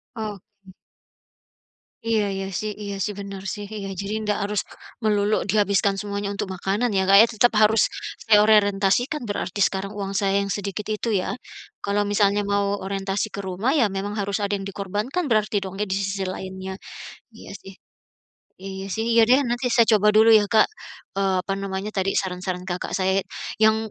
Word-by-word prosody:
Oke. 205 Hz, -3 st, -8 dB, 1.3 s
Iya 225 Hz, -2 st, +2 dB
iya 195 Hz, 0 st, -3 dB
sih 215 Hz, -, -3 dB
iya 200 Hz, -1 st, -4 dB
sih, -, -, -1 dB
bener 195 Hz, -1 st, -7 dB
sih. 205 Hz, -2 st, -7 dB
Iya, 200 Hz, -2 st, -5 dB
jadi 200 Hz, +1 st, -4 dB
nggak 210 Hz, -1 st, 0 dB
harus 205 Hz, 0 st, 0 dB, 0.4 s
melulu 210 Hz, -1 st, +2 dB
dihabiskan 200 Hz, 0 st, +2 dB
semuanya 200 Hz, 0 st, -3 dB
untuk 200 Hz, -, -3 dB
makanan 200 Hz, +6 st, -1 dB
ya, 190 Hz, -, +3 dB
Kak, 195 Hz, -, +8 dB
ya. 225 Hz, -, +8 dB
Tetap 240 Hz, +3 st, +4 dB
harus 215 Hz, 0 st, +5 dB, 0.4 s
saya 215 Hz, -2 st, +5 dB
orientasikan 210 Hz, +6 st, +3 dB
berarti 205 Hz, -1 st, -3 dB
sekarang 195 Hz, 0 st, -3 dB
uang 195 Hz, -1 st, -4 dB
saya 195 Hz, -1 st, +1 dB
yang 200 Hz, -, 0 dB
sedikit 200 Hz, 0 st, -5 dB
itu 215 Hz, -, -4 dB
ya. -, -, -3 dB, 0.5 s
Kalau 200 Hz, +1 st, +1 dB
misalnya 205 Hz, 0 st, +2 dB
mau 200 Hz, 0 st, 0 dB
orientasi 195 Hz, +1 st, -2 dB
ke 200 Hz, -, -4 dB
rumah, 190 Hz, +6 st, -1 dB
ya 285 Hz, -6 st, +4 dB
memang 195 Hz, +2 st, -4 dB
harus 200 Hz, -1 st, -2 dB
ada 205 Hz, 0 st, -1 dB
yang 195 Hz, -, -3 dB
dikorbankan 210 Hz, -, -3 dB
berarti 215 Hz, -2 st, +2 dB
dong 190 Hz, -1 st, -6 dB
ya -, -, -1 dB
di 190 Hz, -, +1 dB
sisi 195 Hz, 0 st, -2 dB
lainnya. 190 Hz, 0 st, -7 dB, 0.6 s
Iya -, -, -12 dB
sih. 195 Hz, -, -11 dB, 0.9 s
Iya 190 Hz, 0 st, -6 dB
sih. 220 Hz, -, -2 dB
Iya 230 Hz, -, +6 dB
deh, 255 Hz, +3 st, +6 dB
nanti 245 Hz, +1 st, -1 dB
saya 235 Hz, -1 st, +4 dB
coba 210 Hz, 0 st, +4 dB
dulu 225 Hz, +1 st, +7 dB
ya, 215 Hz, -2 st, +6 dB
Kak, 220 Hz, 0 st, +5 dB, 0.5 s
eee, 195 Hz, -1 st, +1 dB
apa 195 Hz, -, -2 dB
namanya 195 Hz, +1 st, -4 dB
tadi, 195 Hz, -1 st, 0 dB
saran-saran 180 Hz, -1 st, -2 dB
Kakak. 180 Hz, -1 st, -4 dB
Saya 190 Hz, 0 st, +2 dB
ya -, -, -9 dB, 0.5 s
yang 220 Hz, -, +3 dB
200 Hz, 180 wpm, -23 LUFS, 195-215 Hz, 1.3 s, Kak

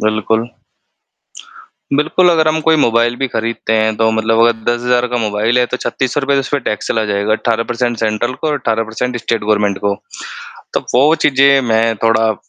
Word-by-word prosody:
बिल्कुल, 110 Hz, +2 st, 0 dB, 1.5 s
बिल्कुल, 155 Hz, +5 st, +2 dB
अगर 160 Hz, -2 st, +2 dB
हम 155 Hz, 0 st, +1 dB
कोई 160 Hz, -, +5 dB
मोबाइल 120 Hz, +1 st, +1 dB
भी 135 Hz, +1 st, -2 dB
ख़रीदते 115 Hz, -1 st, -3 dB
हैं 110 Hz, 0 st, +1 dB
तो 110 Hz, 0 st, +2 dB
मतलब 110 Hz, 0 st, 0 dB
अगर 115 Hz, 0 st, +4 dB, 0.2 s
10,000 125 Hz, +1 st, 0 dB
का 125 Hz, 0 st, -2 dB
मोबाइल 110 Hz, +1 st, 0 dB
है, 125 Hz, -, +2 dB
तो 125 Hz, -, -4 dB
₹3,600 135 Hz, +2 st, -1 dB
उसमें 140 Hz, +1 st, -2 dB
टैक्स 105 Hz, -, -3 dB
चला 110 Hz, -1 st, 0 dB
जाएगा। 100 Hz, 0 st, -1 dB
18 115 Hz, +1 st, -1 dB
परसेंट 120 Hz, -1 st, -1 dB
सेंट्रल 110 Hz, +3 st, -1 dB
को 150 Hz, +5 st, -4 dB
और 150 Hz, -, 0 dB
18 115 Hz, -2 st, -1 dB
परसेंट 125 Hz, +2 st, -3 dB
स्टेट 115 Hz, -2 st, -2 dB
गवर्नमेंट 105 Hz, -2 st, +1 dB
को। 100 Hz, 0 st, +1 dB, 0.8 s
तो -, -, 0 dB
वो 145 Hz, +5 st, +4 dB
चीज़ें 140 Hz, -2 st, +3 dB
मैं 115 Hz, 0 st, +2 dB
थोड़ा 115 Hz, -1 st, +2 dB
115 Hz, 180 wpm, -15 LUFS, 110-130 Hz, 1.5 s, कोई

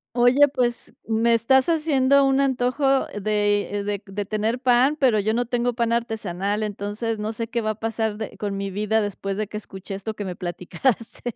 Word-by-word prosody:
Oye, 255 Hz, +4 st, +5 dB
pues, 245 Hz, -4 st, -2 dB, 0.2 s
me 230 Hz, +1 st, +3 dB
estás 260 Hz, +6 st, +3 dB
haciendo 280 Hz, -4 st, +3 dB
un 270 Hz, 0 st, +3 dB
antojo 270 Hz, +1 st, +1 dB
de 205 Hz, 0 st, 0 dB
de 205 Hz, -1 st, -2 dB
de 200 Hz, +1 st, -4 dB
tener 215 Hz, +4 st, -1 dB
pan, 255 Hz, +3 st, +3 dB
pero, 245 Hz, -6 st, +4 dB
yo 215 Hz, +3 st, 0 dB
no 245 Hz, 0 st, +1 dB
tengo 245 Hz, 0 st, 0 dB
pan 235 Hz, -1 st, 0 dB
artesanal, 210 Hz, -3 st, -2 dB
entonces, 210 Hz, +2 st, -3 dB
no 215 Hz, +1 st, -2 dB
sé, 230 Hz, +1 st, -4 dB
qué 235 Hz, +1 st, -2 dB
va 215 Hz, 0 st, 0 dB
a -, -, -6 dB
pasar 220 Hz, -1 st, -2 dB
de 220 Hz, -2 st, -6 dB
con 200 Hz, -1 st, -3 dB
mi 195 Hz, -1 st, -3 dB
vida, 215 Hz, +3 st, +1 dB
después 195 Hz, -1 st, -3 dB
de 215 Hz, -1 st, -2 dB
que 210 Hz, -, -6 dB
escuché 195 Hz, -1 st, -8 dB
esto 215 Hz, +3 st, -5 dB
que 205 Hz, -, -5 dB
me 180 Hz, -2 st, -4 dB
platicaste. 215 Hz, +6 st, -3 dB
220 Hz, 195 wpm, -23 LUFS, 205-245 Hz, 0.2 s, Oye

